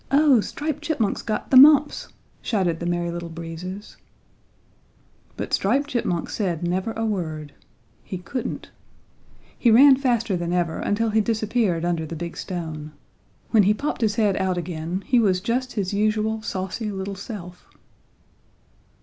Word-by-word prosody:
"Oh, 280 -4 +5
Striped 300 +6 -4
Chipmunk's 290 -10 -1
got 215 -2 -4
the 260 - +7
mumps!" 295 +2 +6 0.3
shouted 180 -7 0
the 170 - -3
Merry 175 0 -1
Little 170 0 -5
Breezes. 170 +4 -8 1.4
But - - -5
Striped 270 +9 +1
Chipmunk 180 -8 -1
said 175 -6 -2
never 185 +5 -1
a 225 0 -2
word. 160 -8 -3 0.5
He 185 - -6
couldn't. 210 +8 -5 0.8
He 240 - +2
ran 265 +5 +8
faster 235 -6 0
than 175 0 -2
ever 175 -2 0
until 220 +2 0
he 220 +1 +3
disappeared 215 -5 0
under 170 -2 -1
the 165 - -6
big 170 +1 -6
stone. 160 -4 -6 0.6
When 220 - +6
he 205 +2 +3
popped 285 +1 -3
his 215 -2 +1
head 210 -3 +2
out 185 -1 0
again 175 +2 -4
he 250 - +3
was 190 -5 +2
just 245 +5 -2
his 200 -2 -2
usual 215 +1 0
saucy 205 +2 -4
little 195 0 -4
self. 190 -3 -9
200 Hz, 150 wpm, -23 LUFS, 175-230 Hz, 1.4 s, ran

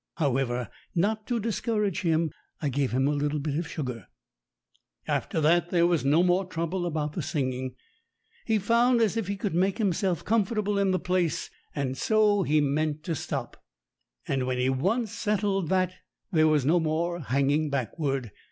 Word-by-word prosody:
However, 125 - 0 0.3
not 215 +5 0
to 240 -2 0
discourage 215 -3 -1
him, 165 -2 +1 0.3
I 145 - -1
gave 135 -1 0
him 130 +3 +2
a - - +2
little 145 +1 0
bit 145 0 -2
of 170 - -4
sugar. 125 - -5 1.0
After - - -1
that 170 +3 +3
there 170 -1 +3
was 170 -2 +2
no 150 +5 +4
more 180 +1 +3
trouble 175 0 -2
about 150 -2 -2
the - - -3
singing. 130 -3 -2 0.7
He'd 220 -4 +1
found 235 +2 +4
as 220 -4 +3
he 200 -3 -2
could 200 -2 -2
make 185 +3 +1
himself 190 -4 0
com 225 0 +3
fortable 205 -1 -1
in 195 - +2
the 185 - +2
place, 180 -2 -1 0.2
and 135 -3 -1
so 210 +3 +3
he 155 -4 +2
meant 150 +1 0
to 170 - -2
stop. 155 - -5 0.6
And 130 -2 0
when 130 0 -1
he 125 +1 +1
once 195 - 0
settled 205 -5 0
that, 185 -1 +2 0.4
there 155 -3 +4
was 150 -4 +2
no 170 +5 +4
more 165 +2 -1
hanging 140 +2 +1
backward. 135 - -2
165 Hz, 170 wpm, -27 LUFS, 145-195 Hz, 1.0 s, no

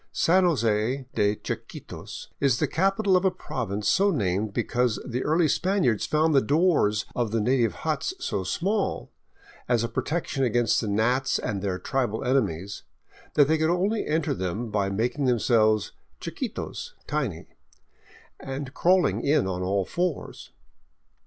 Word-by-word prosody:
San 185 +2 +3
Jose 120 -3 +1
de 105 0 +2
Chiquitos - - -7
is 135 -4 +3
the - - +1
capital 195 +2 +2
of 180 - +3
a 190 - +4
province 105 - -4
so 200 +1 +4
named 105 - 0
because 120 +1 0
the 125 +1 -3
early 160 +2 +3
Spaniards 170 - +1
found 155 +1 +2
the 135 - +5
doors 145 - +2
of 120 -3 0
the 115 +2 0
native 115 -2 +1
huts - - -1
so 100 -2 -2
small, 190 - -1 0.6
as 120 -2 +2
a - - 0
protection 150 0 -2
against 120 -1 +2
gnats 110 +5 +1
and 100 -2 -3
their 95 -2 -1
tribal 120 -2 -2
enemies, 100 -8 -1 0.5
that 145 -2 +6
they 160 +1 +2
could 160 0 +2
only 195 +5 0
enter 155 -1 0
them 105 +2 -3
by 100 -2 0
making 120 +8 -1
themselves 110 -3 +2 0.3
chiquitos - - -5
(tiny) 130 - -2 0.9
and 135 0 -6
crawling 180 +1 +3
in 145 -8 +3
on 90 -1 -3
all 95 +1 0
fours. 175 - -3
125 Hz, 145 wpm, -26 LUFS, 105-160 Hz, 0.9 s, that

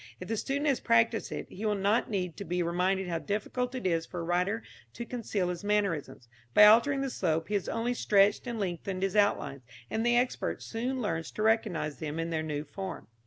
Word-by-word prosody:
If 180 - -8
the 225 - 0
student 280 +6 -2
has 280 -4 +2
practised 230 -1 +2
it, - - -4
he 200 - -9
will 210 -1 +1
not 200 +4 +1
need 180 -5 -2
to 200 - -5
be 180 -1 -1
reminded 180 +2 0
how 170 -2 -1
difficult 245 +6 -2
it 255 - -5
is 165 -3 +1
for 175 +1 -6
a - - -4
writer 180 +6 0 0.3
to 235 - -6
conceal 215 -7 -2
his 175 0 -4
mannerisms. 200 - -1 0.3
By 210 - +10
altering 240 +6 +6
the 275 - -1
slope 165 -4 -1
he - - -3
has 200 -3 0
only 230 +2 -1
stretched 205 0 +3
and 235 -2 -3
lengthened 185 0 -3
his 195 0 0
outlines, 200 -9 +2 0.3
and 220 - 0
the 240 0 +3
expert 250 +1 -1
soon 250 +2 -3
learns 165 -6 -2
to 215 - -2
recognise 180 -9 +1
them 155 0 -4
in 165 +1 -2
their 160 -1 0
new 150 -2 -3
form. 190 +2 -7
200 Hz, 215 wpm, -30 LUFS, 175-230 Hz, 0.3 s, By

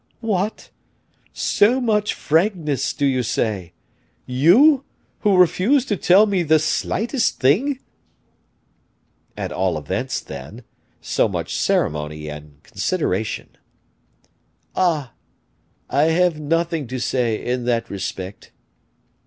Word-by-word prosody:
"What! 210 -2 -2 0.6
so 235 +6 +2
much 210 -4 0
frankness, 160 - 0
do 145 - -1
you 130 -2 +2
say? 100 -7 -2 0.5
you, 205 - +5 0.4
who 205 -3 +3
refuse 195 - +3
to 210 - -1
tell 190 +3 +5
me 200 -4 0
the 160 -1 +4
slightest 225 - -1
thing?" 220 - +2 1.6
"At - - -4
all 90 -3 0
events, 75 -2 -3
then, 90 - -10 0.4
so - - +1
much - - -4
ceremony 75 0 -1
and 75 -1 -11
consideration." 110 - -2 1.3
"Ah! 155 -9 0 0.7
I 140 +3 +2
have 165 0 +2
nothing 165 -1 -1
to 130 +2 -4
say 120 -2 0
in 125 0 -3
that 120 -1 0
respect." 95 0 -6
150 Hz, 105 wpm, -21 LUFS, -, 1.6 s, you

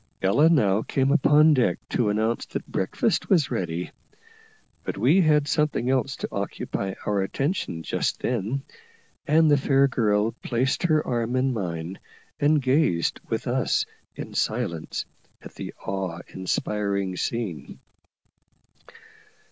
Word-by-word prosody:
Ella 140 +12 +5
now 105 - +3
came 135 +3 0
upon 150 +1 +5
deck 120 -10 +2
to 115 -4 +1
announce 110 +3 0
that - - -5
breakfast - - -1
was 165 -9 +3
ready, 85 0 -3 0.9
but - - -4
we 140 - +4
had 150 -3 +3
something 145 -5 +1
else 130 0 0
to - - -4
occupy 95 -1 -3
our 100 -2 +1
attention 95 - -2
just - - -1
then; 120 +3 -2 0.6
and 155 +1 +5
the 145 - +6
fair 135 0 +3
girl 110 -4 +1
placed 130 +1 0
her 155 -4 +2
arm 120 0 -1
in 130 0 +1
mine, 90 -4 -4 0.4
and 145 0 +3
gazed 130 - +2
with - - -2
us - - +1 0.3
in - - -7
silence 85 -2 -2 0.3
at - - -12
the - - -7
awe 95 -3 -3
inspiring 100 0 -2
scene. 90 - -4
120 Hz, 130 wpm, -25 LUFS, 95-145 Hz, 0.9 s, the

